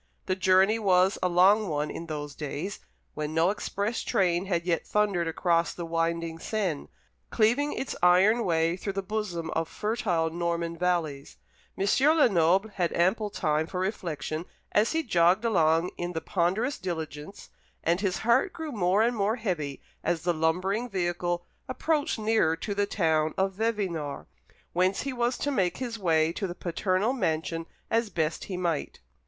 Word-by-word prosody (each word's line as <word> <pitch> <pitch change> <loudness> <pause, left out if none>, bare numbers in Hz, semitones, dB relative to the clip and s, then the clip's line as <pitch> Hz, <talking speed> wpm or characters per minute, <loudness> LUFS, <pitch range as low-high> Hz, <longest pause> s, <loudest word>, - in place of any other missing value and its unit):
The 185 - 0
journey 190 +4 +4
was 190 -2 +3
a 180 - +2
long 195 +4 +5
one 150 -2 -2
in 165 - -7
those 150 -2 -5
days, 150 +7 -5 0.3
when 150 +1 -4
no 165 +3 +4
express 210 +2 -2
train 180 -1 +1
had 170 -3 -1
yet 170 -2 0
thundered 200 -5 +1
across 170 +1 +1
the 170 - -5
winding 165 0 -1
Seine, 185 -7 -2 0.4
cleaving 245 +7 +2
its 265 - -4
iron 190 +7 +5
way 165 -2 +1
through 195 +1 -4
the 195 0 -3
bosom 185 -5 -3
of 165 0 -1
fertile 205 -7 -1
Norman 170 0 -2
valleys. 165 -5 -2 0.4
M. 195 - 0 0.3
Lenoble 195 - +4
had 180 -4 -1
ample 195 +5 +1
time 155 -5 0
for 180 - -4
reflection 170 -4 -3 0.3
as 215 +6 +2
he 325 0 +1
jogged 180 - +3
along 165 -5 +3
in 175 0 -3
the 165 - -1
ponderous 190 - 0
diligence; 160 -1 -6 0.3
and 170 +3 +1
his 190 -3 0
heart 255 - +3
grew 320 -2 -5
more 200 -2 +2
and 240 +1 +1
more 210 +1 +1
heavy 170 - -3 0.2
as 170 -1 -1
the 175 0 +2
lumbering 185 +9 0
vehicle 175 -2 -1 0.2
approached 295 +2 0
nearer 215 -7 +2
to 205 +4 -4
the 200 0 0
town 160 -5 +1
of 195 0 +1
Vevinord, 190 -9 -2 0.5
whence 185 +2 +1
he 275 -1 -3
was 240 0 0
to 285 - -1
make 185 -9 0
his 235 -3 -4
way 160 -3 +2
to 195 - -3
the 175 - -6
paternal 185 +6 0
mansion 165 -6 -2 0.2
as 230 -1 +1
best 160 -4 -2
he 185 - -5
might. 170 -4 -2
180 Hz, 165 wpm, -27 LUFS, 165-210 Hz, 0.5 s, long